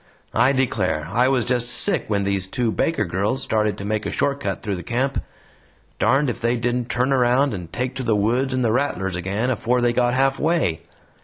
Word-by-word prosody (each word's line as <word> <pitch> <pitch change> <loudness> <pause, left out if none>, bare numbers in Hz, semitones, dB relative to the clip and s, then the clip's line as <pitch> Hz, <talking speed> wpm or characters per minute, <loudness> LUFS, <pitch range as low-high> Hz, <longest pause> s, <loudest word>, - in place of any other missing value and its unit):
I 135 - +4
declare, 100 - 0
I 120 +5 +3
was 130 -4 +1
just 120 -1 0
sick - - +2
when 100 -2 0
these 100 -1 -1
two 115 +3 -1
Baker 165 +8 0
girls 100 +9 -1
started 105 -2 0
to 100 - -6
make 105 +1 -1
a - - -3
short 140 0 0
cut - - -4
through 100 -4 -2
the - - -6
camp. 125 +8 -1 0.8
Darned 140 +3 +3
if 120 - -3
they 120 +1 +1
didn't 120 +1 -1
turn 125 +3 0
round 130 +1 +3
and 90 -4 -7
take 125 +1 -2
to 130 - -3
the 115 -3 +2
woods 120 +6 +1
and 130 -1 0
the 110 - +2
rattlers 105 -8 -1
again 100 +7 -1
afore 125 +1 0
they 120 -1 +2
got 120 0 +2
halfway. 135 - +1
120 Hz, 210 wpm, -22 LUFS, 105-130 Hz, 0.8 s, I